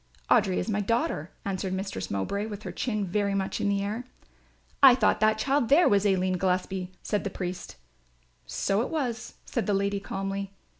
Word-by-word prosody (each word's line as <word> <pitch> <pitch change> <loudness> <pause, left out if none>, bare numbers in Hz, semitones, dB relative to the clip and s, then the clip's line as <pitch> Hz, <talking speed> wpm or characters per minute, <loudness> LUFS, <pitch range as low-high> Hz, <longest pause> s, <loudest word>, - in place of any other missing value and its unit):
"Audry 190 -3 +4
is - - -1
my 210 -2 0
daughter," 230 - 0 0.2
answered 190 -1 -2
Mistress 190 - -4
Mowbray 200 - -2
with 210 -1 -7
her - - -5
chin 215 -5 -2
very 200 +2 0
much 195 -1 -2
in 205 - +1
the 200 0 +1
air. 215 +4 -3 0.8
"I 265 -3 +9
thought 240 -4 +2
that 215 0 +3
child 265 +2 +1
there 310 +6 +6
was 205 0 +3
Aline 185 -1 +1
Gillespie," 185 0 -1
said 210 - -1
the 200 - -2
priest. 180 -1 -5 0.7
"So 195 - 0
it 245 - -2
was," 250 -8 -3
said 235 - -2
the 205 - +2
lady, 200 0 0
calmly. 195 0 -4
200 Hz, 185 wpm, -27 LUFS, 190-220 Hz, 0.8 s, I